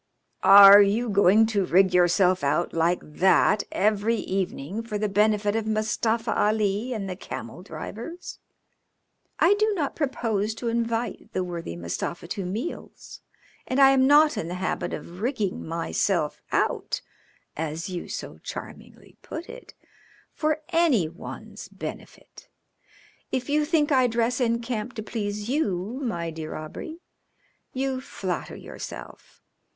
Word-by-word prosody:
"Are 200 Hz, +1 st, +10 dB
you 215 Hz, +4 st, +2 dB
going 200 Hz, +2 st, +5 dB
to 210 Hz, -3 st, 0 dB
rig 185 Hz, +1 st, +3 dB
yourself 180 Hz, 0 st, +3 dB
out 145 Hz, +5 st, 0 dB
like 165 Hz, +2 st, +1 dB
that 190 Hz, +6 st, +3 dB
every 215 Hz, +3 st, +1 dB
evening 190 Hz, -2 st, -3 dB
for 230 Hz, -2 st, -4 dB
the 210 Hz, +1 st, 0 dB
benefit 210 Hz, +1 st, +2 dB
of 225 Hz, -1 st, -1 dB
Mustafa 220 Hz, +1 st, 0 dB
Ali 210 Hz, +2 st, +1 dB
and 210 Hz, -5 st, -3 dB
the 185 Hz, -, -4 dB
camel 180 Hz, -2 st, -8 dB
drivers?" 220 Hz, -, -8 dB, 1.0 s
"I 360 Hz, -, +5 dB
do 430 Hz, +1 st, +1 dB
not 295 Hz, -6 st, -2 dB
propose 225 Hz, -7 st, -1 dB
to 235 Hz, 0 st, -3 dB
invite 230 Hz, -1 st, -2 dB
the 185 Hz, -, 0 dB
worthy 170 Hz, -, -5 dB
Mustafa 85 Hz, -, -5 dB
to 195 Hz, -1 st, -3 dB
meals, 220 Hz, -, -6 dB, 0.5 s
and 255 Hz, -, 0 dB
I 270 Hz, -1 st, +8 dB
am 265 Hz, -1 st, +4 dB
not 300 Hz, +2 st, +5 dB
in 165 Hz, -, -3 dB
the 175 Hz, -, -4 dB
habit 185 Hz, +1 st, -2 dB
of 175 Hz, +3 st, -8 dB
'rigging 220 Hz, -6 st, -2 dB
myself 165 Hz, 0 st, -1 dB
out,' -, -, 0 dB, 0.5 s
as 160 Hz, +1 st, -4 dB
you 180 Hz, -2 st, -5 dB
so -, -, -6 dB
charmingly -, -, -10 dB
put 325 Hz, +2 st, -7 dB
it, -, -, -12 dB, 0.6 s
for 310 Hz, 0 st, -1 dB
any 320 Hz, -, +3 dB
one's 170 Hz, -, -9 dB
benefit. -, -, -10 dB, 0.8 s
If 255 Hz, +1 st, -2 dB
you 300 Hz, 0 st, +2 dB
think 300 Hz, -1 st, +1 dB
I 260 Hz, -2 st, +4 dB
dress 235 Hz, +2 st, 0 dB
in 235 Hz, -1 st, +1 dB
camp 230 Hz, 0 st, -4 dB
to 220 Hz, -, -5 dB
please 210 Hz, -1 st, -4 dB
you, 235 Hz, -, -1 dB
my 170 Hz, -10 st, -3 dB
dear 160 Hz, -1 st, -6 dB
Aubrey, 315 Hz, -, -8 dB, 0.7 s
you 265 Hz, 0 st, -2 dB
flatter 185 Hz, -8 st, -5 dB
yourself. -, -, -10 dB
215 Hz, 140 wpm, -25 LUFS, 185-250 Hz, 1.0 s, Are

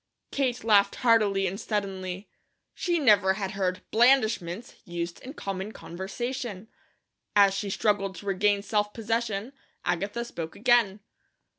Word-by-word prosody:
Kate 255 Hz, -3 st, -1 dB
laughed 205 Hz, -3 st, +4 dB
heartily 210 Hz, -4 st, +4 dB
and 190 Hz, +2 st, -2 dB
suddenly. 195 Hz, -3 st, -3 dB, 0.5 s
She 350 Hz, -2 st, 0 dB
never 205 Hz, -, +4 dB
had 195 Hz, -2 st, -3 dB
heard 190 Hz, -1 st, -2 dB
"blandishments" 225 Hz, -5 st, +2 dB
used 170 Hz, -2 st, -5 dB
in 270 Hz, +4 st, -9 dB
common 195 Hz, +2 st, -4 dB
conversation. 220 Hz, +3 st, -5 dB, 0.7 s
As 200 Hz, -1 st, +6 dB
she 200 Hz, +1 st, -3 dB
struggled 195 Hz, -1 st, 0 dB
to 190 Hz, -, -10 dB
regain 200 Hz, +1 st, +2 dB
self 210 Hz, -1 st, 0 dB
possession 225 Hz, +1 st, -2 dB, 0.3 s
Agatha 205 Hz, +7 st, -1 dB
spoke 165 Hz, -8 st, -6 dB
again. 225 Hz, -4 st, +3 dB
205 Hz, 125 wpm, -27 LUFS, 190-230 Hz, 0.7 s, As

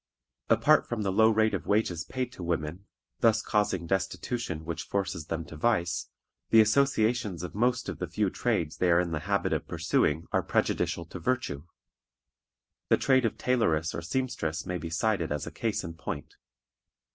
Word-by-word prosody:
Apart -, -, +4 dB
from 115 Hz, -3 st, -2 dB
the 95 Hz, -, 0 dB
low 110 Hz, +3 st, +5 dB
rate 110 Hz, 0 st, +3 dB
of -, -, -3 dB
wages 100 Hz, -6 st, +1 dB
paid 130 Hz, -1 st, -3 dB
to 130 Hz, -, -10 dB
women, 85 Hz, +2 st, -3 dB, 0.3 s
thus 115 Hz, -1 st, +3 dB
causing 105 Hz, -5 st, 0 dB
destitution 95 Hz, -1 st, -2 dB
which 85 Hz, 0 st, -3 dB
forces 95 Hz, -6 st, -3 dB
them 80 Hz, 0 st, -3 dB
to 80 Hz, -, -10 dB
vice, 90 Hz, -1 st, 0 dB, 0.4 s
the 115 Hz, -, +6 dB
associations 110 Hz, -, +2 dB
of 90 Hz, -, -6 dB
most 120 Hz, +4 st, +1 dB
of -, -, -5 dB
the -, -, -2 dB
few -, -, 0 dB
trades 80 Hz, -2 st, -1 dB
they 90 Hz, -, +2 dB
are 85 Hz, 0 st, +5 dB
in 90 Hz, -1 st, -1 dB
the 80 Hz, -, -1 dB
habit -, -, +1 dB
of -, -, -2 dB
pursuing 80 Hz, +3 st, +1 dB
are -, -, +2 dB
prejudicial 85 Hz, -, 0 dB
to 90 Hz, -, -8 dB
virtue. 80 Hz, -, -2 dB, 1.2 s
The -, -, +5 dB
trade 130 Hz, -2 st, +3 dB
of 115 Hz, -, -1 dB
tailoress 85 Hz, -11 st, +1 dB
or -, -, -4 dB
seamstress 85 Hz, -6 st, -2 dB
may 90 Hz, -1 st, -3 dB
be 85 Hz, -, -5 dB
cited 85 Hz, 0 st, 0 dB
as 75 Hz, -1 st, -2 dB
a -, -, -6 dB
case 105 Hz, -2 st, -2 dB
in 85 Hz, -2 st, -6 dB
point. 75 Hz, -3 st, -6 dB
95 Hz, 180 wpm, -28 LUFS, 85-110 Hz, 1.2 s, the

